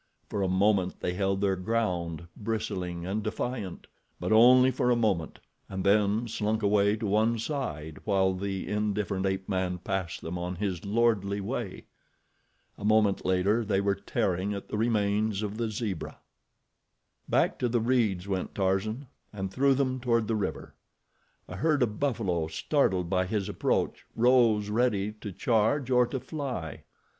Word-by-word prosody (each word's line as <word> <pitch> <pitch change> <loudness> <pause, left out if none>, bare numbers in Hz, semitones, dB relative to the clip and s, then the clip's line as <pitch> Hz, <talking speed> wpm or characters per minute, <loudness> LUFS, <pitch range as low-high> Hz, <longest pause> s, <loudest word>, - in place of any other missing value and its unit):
For 100 - -1
a 95 - +1
moment 95 0 +2
they 90 - -1
held 95 +1 0
their 100 -1 +2
ground, 90 -5 -2
bristling 90 -5 -3
and 100 +4 -2
defiant; 105 -4 -4 0.3
but - - -2
only 125 +3 +7
for 125 0 0
a 120 - +4
moment, 100 -9 0 0.3
and 95 -1 -4
then 105 +3 +3
slunk 110 -1 -1
away 100 0 +3
to 110 0 -4
one 110 +3 +2
side 80 - -4
while 95 -2 +2
the 95 0 -4
indifferent 105 -2 -1
ape 95 0 -2
man 95 -2 -1
passed 90 -1 -3
them 90 +2 -5
on 90 +1 -3
his 90 -2 -3
lordly 100 -2 +1
way. 100 0 -4 0.9
A - - -8
moment 105 -2 +3
later 95 +5 +2
they 100 -2 +1
were 100 0 +2
tearing 100 -1 -1
at 100 - -8
the - - -3
remains 105 -2 +1
of 105 0 -4
the 115 -1 -1
zebra. 105 -5 -4 1.1
Back - - +2
to 125 - +1
the 120 +1 +1
reeds 110 -6 +1
went 95 -2 -3
Tarzan, 100 +7 0 0.3
and 95 -2 -4
through 135 +3 +3
them 130 -1 0
toward 115 -3 +1
the 115 - 0
river. 105 -3 -3 0.7
A 90 - -7
herd 150 +3 +2
of 105 -3 -2
buffalo, 100 - 0
startled 95 - +1
by 90 0 +1
his 100 -1 -1
approach, - - -1
rose 115 -3 +4
ready 105 -3 +1
to 105 - -5
charge 120 +6 +1
or 125 -1 +4
to 135 - -3
fly. 130 - -5
105 Hz, 160 wpm, -28 LUFS, 95-115 Hz, 1.1 s, only